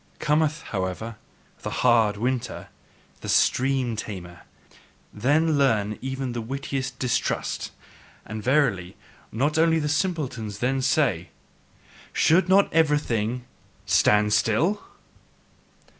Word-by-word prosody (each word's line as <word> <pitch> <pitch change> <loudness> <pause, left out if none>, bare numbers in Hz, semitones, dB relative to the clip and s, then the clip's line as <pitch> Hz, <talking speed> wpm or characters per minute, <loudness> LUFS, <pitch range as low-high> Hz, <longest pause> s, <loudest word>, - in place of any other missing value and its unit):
Cometh, 155 +1 +1
however, 100 +4 -4 0.4
the - - -4 0.2
hard 115 -4 +4
winter, 125 +1 -3 0.5
the - - -7
stream 130 -2 +2
tamer, 90 -5 -7 0.7
then 150 +3 +2
learn 110 -6 +1
even 130 -1 -3
the 120 -1 -4
wittiest 135 +1 -4
distrust, 125 -3 -1 0.6
and 110 0 -6
verily, 115 -8 +1 0.3
not 145 +7 0
only 165 0 +4
the 150 -2 -1
simpletons 145 - -2
then 130 +4 0
say: 130 - +1 0.8
"Should 175 +3 +3
not 195 +1 +4
everything 125 -7 +1 0.4
STAND 105 0 +3
STILL?" 160 - +2
130 Hz, 100 wpm, -25 LUFS, 110-150 Hz, 0.8 s, hard